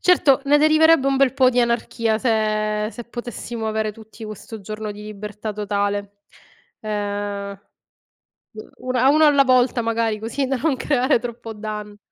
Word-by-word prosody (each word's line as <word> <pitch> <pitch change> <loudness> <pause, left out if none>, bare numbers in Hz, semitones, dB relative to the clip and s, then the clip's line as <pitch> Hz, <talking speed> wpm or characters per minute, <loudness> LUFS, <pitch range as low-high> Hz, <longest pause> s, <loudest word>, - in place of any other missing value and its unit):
certo, 290 -7 +4
ne 290 +1 +4
deriverebbe 310 -1 +5
un 275 0 +2
bel 270 -1 +3
po' 260 -2 +4
di 250 0 +2
anarchia 230 -2 0
se 215 -2 0
se 240 - -8
potessimo 235 -1 -6
avere 215 0 -1
tutti 220 +1 -12
questo 215 +1 -9
giorno 215 +1 -6
di 205 +1 -11
libertà 210 0 -6
totale. 205 -1 -2 0.6
Ehm, 205 -1 -4 1.0
u 215 +3 -12
una 255 +1 +3
uno 310 +2 +5
alla 285 -2 +5
volta 255 -1 +3
magari, 225 -1 -1
così 235 +6 -2
da 270 0 0
non 290 +2 0
creare 260 -1 +1
troppo 230 -1 -7
danno. 210 -1 -7
225 Hz, 155 wpm, -21 LUFS, 210-255 Hz, 1.0 s, deriverebbe